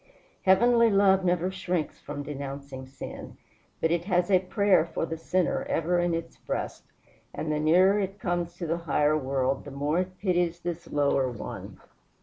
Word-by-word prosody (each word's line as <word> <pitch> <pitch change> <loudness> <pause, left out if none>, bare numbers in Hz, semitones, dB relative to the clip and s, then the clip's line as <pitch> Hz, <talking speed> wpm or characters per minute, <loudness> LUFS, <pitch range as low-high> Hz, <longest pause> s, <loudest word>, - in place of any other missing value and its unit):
Heavenly 230 +5 +5
love 195 -2 +4
never 180 0 +1
shrinks 180 -4 -3
from 145 0 -6
denouncing 140 -2 -7
sin; 135 - -9 0.4
but 160 - +1
it 170 0 0
has 180 -1 +1
a 185 - +6
prayer 190 0 +3
for 165 0 -3
the 165 - -4
sinner 180 +2 0
ever 175 +2 +1
in 175 -1 +1
its 165 - -6
breast, - - -4 0.5
and 155 - -3
the 150 - 0
nearer 185 +6 +4
it 195 0 -3
comes 175 -2 -2
to 175 - -5
the 165 +1 -1
higher 150 +1 +3
world 135 -2 0
the - - -9
more 145 +4 -1
it 185 0 -3
pities 175 -3 0
this 175 -1 -5
lower 140 -2 +2
one. 120 -3 -8
170 Hz, 170 wpm, -27 LUFS, 150-185 Hz, 0.5 s, a